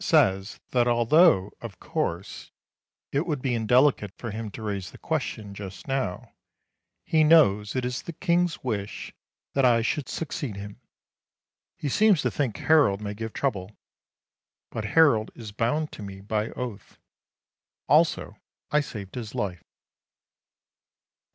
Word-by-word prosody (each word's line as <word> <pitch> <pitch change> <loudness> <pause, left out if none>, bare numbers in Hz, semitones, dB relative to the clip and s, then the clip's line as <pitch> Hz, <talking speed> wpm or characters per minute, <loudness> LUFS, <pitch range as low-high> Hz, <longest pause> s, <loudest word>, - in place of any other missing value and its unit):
says 95 +2 +2
that 120 -1 +3
although, 120 - +4
of 110 -6 -8
course, 85 +3 -4 0.6
it 145 +6 0
would 150 -4 -1
be 125 -1 -1
indelicate 120 -1 +3
for 115 - -5
him 110 +1 -5
to 110 - -9
raise 100 -4 -3
the - - -14
question 100 -2 -3
just 100 +2 -9
now, 130 -9 -3 0.7
he 155 -1 +3
knows 105 -11 +5
it 130 -1 0
is 125 0 -2
the - - -7
King's 175 0 0
wish 105 -5 -4 0.4
that 135 - +2
I 120 -2 +4
should 140 +3 -1
succeed 140 -8 -4
him. 100 +1 -9 1.0
He - - -4
seems 200 - +4
to - - +1
think 130 -8 -1
Harold 145 -11 +4
may 105 -1 -4
give 110 +1 -5
trouble. 105 -8 -3 0.9
But 110 - -4
Harold 115 -3 +4
is 110 -4 -8
bound 135 +9 -1
to - - -10
me 100 -1 -8
by 105 +2 -2
oath. 120 -5 -7 0.9
Also - - +3 0.3
I 150 - +4
saved 105 -8 -8
his 115 -4 -6
life. 90 -4 -2
115 Hz, 140 wpm, -26 LUFS, 100-140 Hz, 1.0 s, knows